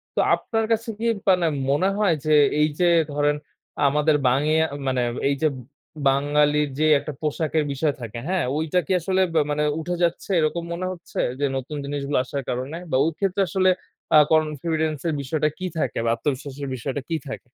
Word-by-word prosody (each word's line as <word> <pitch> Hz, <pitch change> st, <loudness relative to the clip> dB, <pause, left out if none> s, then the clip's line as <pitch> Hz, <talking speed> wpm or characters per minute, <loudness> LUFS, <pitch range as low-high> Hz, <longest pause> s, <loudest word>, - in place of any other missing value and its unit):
তো -, -, 0 dB, 0.2 s
আপনার 225 Hz, -1 st, -2 dB
কাছে 225 Hz, +1 st, 0 dB
কি 230 Hz, -, -2 dB, 0.2 s
মানে 180 Hz, -2 st, +4 dB, 0.2 s
মনে 165 Hz, +8 st, +2 dB
হয়, 205 Hz, -5 st, +3 dB
যে, 155 Hz, -, +3 dB, 0.3 s
এই 150 Hz, -, +5 dB
যে, 175 Hz, -, +4 dB, 0.3 s
ধরেন 145 Hz, 0 st, +2 dB, 0.5 s
আমাদের 150 Hz, +2 st, +2 dB
বাংগিয়ে 150 Hz, +5 st, +3 dB, 0.2 s
মানে 130 Hz, -1 st, +1 dB, 0.3 s
এই 140 Hz, -, +1 dB
যে, -, -, +6 dB, 0.6 s
বাঙালির 145 Hz, +1 st, +2 dB
যে, 155 Hz, -, +3 dB
একটা 150 Hz, -, -6 dB
পোশাকের 155 Hz, +1 st, 0 dB
বিষয় 145 Hz, +1 st, 0 dB
থাকে, 115 Hz, 0 st, -6 dB
হ্যাঁ? 185 Hz, -1 st, +1 dB
ঐটা 160 Hz, +3 st, +1 dB
কি -, -, -5 dB
আসলে 190 Hz, +3 st, 0 dB
ব -, -, -7 dB, 0.2 s
মানে 150 Hz, +1 st, 0 dB, 0.2 s
উঠে 175 Hz, +2 st, -3 dB
যাচ্ছে, 170 Hz, +3 st, -1 dB
এরকম 160 Hz, +2 st, 0 dB
মনে 185 Hz, +2 st, -3 dB
হচ্ছে 175 Hz, -2 st, -7 dB, 0.2 s
যে, 145 Hz, -, +1 dB
নতুন 135 Hz, +4 st, -5 dB
জিনিসগুলো 140 Hz, 0 st, -2 dB
আসার 140 Hz, -1 st, -5 dB
কারণে? 130 Hz, +6 st, -3 dB
বা -, -, +1 dB
ওই 165 Hz, -, +1 dB
ক্ষেত্রে 195 Hz, 0 st, 0 dB
আসলে 185 Hz, -1 st, +3 dB, 0.5 s
আ -, -, +10 dB
confidence 155 Hz, -1 st, 0 dB
এর 160 Hz, -, 0 dB
বিষয়টা 150 Hz, +3 st, 0 dB
কি 185 Hz, -, -3 dB
থাকে 125 Hz, -, -1 dB
বা 115 Hz, -, +2 dB
আত্মবিশ্বাসের 140 Hz, +1 st, -4 dB
বিষয়টা 135 Hz, +3 st, -4 dB
কি 165 Hz, -, 0 dB
থাক? 135 Hz, -, -5 dB
150 Hz, 180 wpm, -23 LUFS, 140-170 Hz, 0.6 s, আ